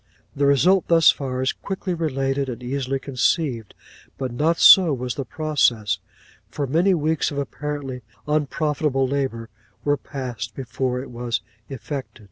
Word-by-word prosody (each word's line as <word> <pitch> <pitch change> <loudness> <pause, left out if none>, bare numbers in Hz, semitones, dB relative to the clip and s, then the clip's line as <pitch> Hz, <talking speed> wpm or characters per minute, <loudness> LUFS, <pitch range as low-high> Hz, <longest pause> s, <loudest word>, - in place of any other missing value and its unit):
'The 140 0 +2
result 175 +7 +4
thus 165 -1 +6
far, 130 -2 -3
is 130 - +1
quickly 190 -1 -4
related, 135 -4 -1
and 125 0 -6
easily 135 +1 -2
conceived; 130 - -1 0.4
but 130 -2 -3
not 160 +7 +1
so 185 -4 +8
was 125 -2 -2
the 140 - -4
process; 130 -7 +1 0.5
for 145 - -3
many 170 +8 +3
weeks 160 0 0
of 145 - -6
apparently 140 -2 -4 0.3
unprofitable 150 -2 0
labour 130 -4 -2 0.4
were 145 0 +2
passed 120 -6 -6
before 125 0 -2
it - - -11
was 120 -1 -2 0.3
effected. 135 -1 -6
140 Hz, 140 wpm, -23 LUFS, 125-150 Hz, 0.5 s, so